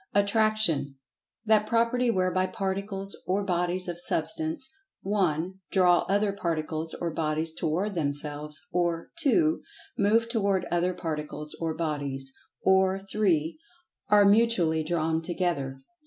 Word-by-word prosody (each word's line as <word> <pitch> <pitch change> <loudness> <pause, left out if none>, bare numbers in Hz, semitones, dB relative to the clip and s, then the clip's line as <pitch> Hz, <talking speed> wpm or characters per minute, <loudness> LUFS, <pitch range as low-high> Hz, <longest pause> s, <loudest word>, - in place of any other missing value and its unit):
Attraction: 200 -9 +2 0.5
That 215 -1 +3
property 235 +2 +2
whereby 185 -2 +1
particles 195 -1 -3
or 195 +3 +1
bodies 180 0 +1
of 175 0 -5
Substance 315 - -1 0.4
(1) 185 -2 -1
draw 180 -2 +4
other 200 +1 +2
particles 160 -4 -3
or 170 -1 -3
bodies 160 0 -1
toward 175 +6 -1
themselves; 150 -1 -1
or 170 -1 -1
(2) 315 +3 +3 0.4
move 220 +3 +3
toward 200 -6 0
other 175 +1 +1
particles 150 -1 -5
or 165 -1 -1
bodies; 140 -4 -3 0.3
or 190 0 +4
(3) 195 -5 0 0.5
are 205 -1 +6
mutually 200 -7 +3
drawn 160 0 0
together. 165 -6 -2
180 Hz, 115 wpm, -27 LUFS, 160-205 Hz, 0.5 s, are